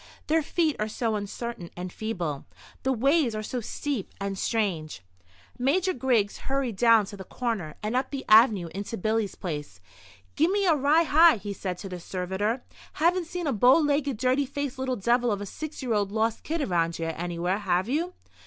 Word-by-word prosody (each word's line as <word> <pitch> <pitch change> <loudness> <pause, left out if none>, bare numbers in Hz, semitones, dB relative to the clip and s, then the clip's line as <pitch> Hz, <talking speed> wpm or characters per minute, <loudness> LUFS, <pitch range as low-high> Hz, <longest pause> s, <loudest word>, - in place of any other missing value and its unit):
Their 320 +1 +2
feet 315 -1 0
are 215 - 0
so 220 +1 -1
uncertain 205 -2 -5
and 180 0 -5
feeble; 175 -10 -4 0.3
the 265 - 0
ways 265 0 +2
are 215 - -3
so 245 +3 -3
steep 260 -1 -4
and 200 0 -3
strange. 185 - -2 0.6
Major 355 +9 +2
Griggs 240 -6 +1
hurried 270 -5 -1
down 225 0 +5
to 205 +1 -9
the 190 - -7
corner, 200 -8 -3
and 215 +3 -1
up 255 - 0
the 275 -2 -5
avenue 215 -5 +6
into 200 +4 -4
Billy's 215 0 0
place. 150 - -6 0.6
"Gimme 385 +6 +2
a 340 - +5
rye 295 +4 +4
high," 320 -1 +6
he 205 0 -5
said 185 -2 -4
to 195 - -7
the 180 -1 -6
servitor. 190 +7 -2 0.3
"Haven't 340 +2 +1
seen 355 0 -4
a 285 - +1
bow 245 +6 +6
legged, 285 -4 +1
dirty 255 +3 +1
faced 280 -1 -4
little 260 -1 -1
devil 240 +2 +2
of 205 - -1
a 205 - -5
six 310 +7 -7
year 245 -3 0
old 205 -2 0
lost 220 +1 0
kid 320 -1 -2
around 170 -6 0
here 165 0 -3
anywhere, 175 +3 -2
have 185 -1 0
you?" 330 +8 -1
225 Hz, 190 wpm, -27 LUFS, 195-275 Hz, 0.6 s, avenue